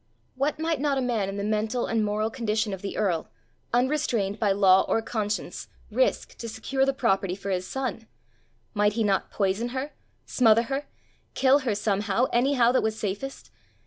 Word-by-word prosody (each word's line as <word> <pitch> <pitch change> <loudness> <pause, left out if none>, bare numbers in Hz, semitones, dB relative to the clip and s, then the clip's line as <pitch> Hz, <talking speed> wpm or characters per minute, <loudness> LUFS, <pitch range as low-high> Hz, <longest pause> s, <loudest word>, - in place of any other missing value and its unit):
What 275 +3 -1
might 320 -2 0
not 285 -2 +1
a - - +2
man 235 -6 0
in 195 - -5
the 200 - -2
mental 215 +3 0
and 225 -1 0
moral 210 +1 -1
condition 220 -3 -1
of 190 - -6
the 200 - -5
earl, 180 -6 0 0.4
unrestrained 245 -6 0
by 210 -3 +2
law 190 -1 +5
or - - +2
conscience, 215 -2 -3 0.2
risk - - 0
to 230 - -5
secure 265 +5 -1
the - - +4
property 195 -8 +1
for 195 0 -5
his 185 0 -1
son? 255 -4 -4 0.7
Might 210 -1 +2
he 225 +1 0
not 195 -2 +1
poison 200 +4 0
her, 280 +3 -4 0.3
smother 230 -2 +4
her, 270 +4 -3 0.5
kill 270 +2 +5
her 245 -7 -1
somehow, 205 +2 +1
anyhow 245 -1 +4
that 260 - +3
was 220 0 -1
safest? 210 +7 -5
220 Hz, 175 wpm, -26 LUFS, 205-260 Hz, 0.7 s, law